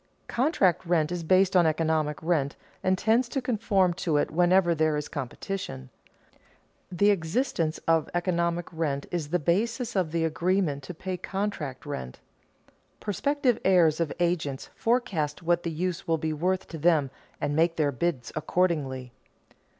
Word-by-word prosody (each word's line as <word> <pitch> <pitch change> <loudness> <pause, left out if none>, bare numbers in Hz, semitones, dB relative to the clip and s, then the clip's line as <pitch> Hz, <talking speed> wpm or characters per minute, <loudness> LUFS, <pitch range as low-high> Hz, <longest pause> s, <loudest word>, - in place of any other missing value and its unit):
Contract 235 - +2
rent 170 -3 +1
is 175 -1 -2
based 185 +3 +3
on 175 -2 +6
economic 155 -1 0
rent 155 -4 0 0.3
and 185 0 +2
tends 230 +5 +2
to 270 - -1
conform 210 -7 +1
to 170 -4 0
it 145 - 0
whenever 175 +1 +4
there 155 -1 +1
is 150 - -3
competition. 135 - -5 1.0
The 200 +3 +4
existence 165 - 0
of 165 -1 +3
economic 170 -1 0
rent 145 -4 -2
is 165 -4 -2
the 175 - +2
basis 220 - 0
of 180 -5 +1
the 165 0 +1
agreement 170 -2 0
to 180 - -7
pay 185 +2 -4
contract 180 -11 -4
rent. 65 - -6 0.8
Prospective 250 +3 0
hirers 170 -5 +4
of 165 -3 0
agents 165 -6 -1
forecast 190 -11 0
what 170 +1 +2
the 170 - -3
use 180 +3 -3
will 165 -1 +2
be 155 0 -2
worth 185 +5 -1
to 165 - -7
them 155 -4 +3 0.3
and 145 0 -1
make 165 +1 +3
their 150 -3 +1
bids 140 -1 -2
accordingly. 150 -7 -1
170 Hz, 150 wpm, -27 LUFS, 155-185 Hz, 1.0 s, on